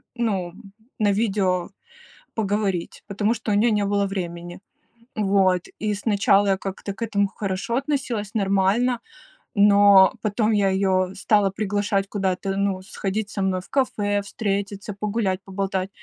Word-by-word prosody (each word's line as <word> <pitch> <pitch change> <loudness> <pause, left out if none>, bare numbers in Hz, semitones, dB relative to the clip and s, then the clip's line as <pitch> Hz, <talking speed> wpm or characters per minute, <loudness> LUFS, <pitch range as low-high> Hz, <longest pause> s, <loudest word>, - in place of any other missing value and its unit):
ну, 195 -7 -1 0.5
на 210 -2 +3
видео 195 -4 0 0.7
поговорить, 200 -4 -2
потому 205 +2 0
что 225 -2 -5
у - - +2
нее 225 +3 +3
не 205 -1 +1
было 200 0 +1
времени, 175 -2 -5 0.6
вот. 195 -3 +2
И 210 0 -1
сначала 200 -1 +2
я 195 - +2
как-то 195 +1 -5
к 195 - -17
этому 200 -2 +1
хорошо 195 +3 -3
относилась, 260 -7 -2
нормально, 200 +5 +2 0.6
но 200 -1 +7
потом 215 +1 0
я 200 -2 +3
её 190 -1 +1
стала 205 0 +2
приглашать 200 0 -1
куда-то, 195 -1 -1
ну, 200 -1 0
сходить 200 +1 -3
со 200 - -3
мной 190 -1 0
в - - -18
кафе, 205 -7 0
встретиться, 200 0 -3
погулять, 200 -2 -1
поболтать. 190 -1 -2
200 Hz, 140 wpm, -23 LUFS, 190-210 Hz, 0.7 s, но